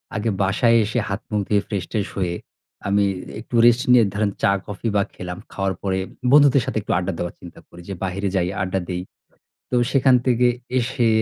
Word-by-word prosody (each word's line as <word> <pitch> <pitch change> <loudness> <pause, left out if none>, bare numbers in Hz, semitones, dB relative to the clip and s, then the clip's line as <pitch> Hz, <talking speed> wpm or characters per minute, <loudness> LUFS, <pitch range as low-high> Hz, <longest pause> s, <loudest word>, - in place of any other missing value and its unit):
আগে 110 +2 -1
বাসায় 115 +5 +3
এসে 110 +3 -1
হাত 100 +4 -3
মুখ 105 - +1
ধুয়ে, 100 -1 +2
ফ্রেশ-ট্রেশ 100 +1 -3
হয়ে, 90 -2 -1 0.5
আমি 100 +1 +3 0.4
একটু 120 +1 -7
রেস্ট 120 0 +6
নিয়ে 120 -2 +7
ধরেন 105 -1 0
চা 100 - +4
কফি 105 +3 -5
বা 100 - +4
খেলাম। 90 0 -6 0.2
খাওয়ার 95 -1 -1
পরে 95 -1 -1 0.3
বন্ধুদের 140 -2 +6
সাথে - - -3
একটু - - -5
আড্ডা 90 +1 -1
দেওয়ার 85 - -4
চিন্তা 85 - -12
করি 85 - -13
যে, - - -3
"বাহিরে 95 +1 -2
যাই, 90 -1 +1
আড্ডা 95 0 -1
দেই।" 90 0 -2 0.7
তো 125 - -1 0.2
সেখান 130 -2 +4
থেকে 125 -1 +3 0.3
এসে 120 0 0
100 Hz, 185 wpm, -22 LUFS, 95-120 Hz, 0.7 s, নিয়ে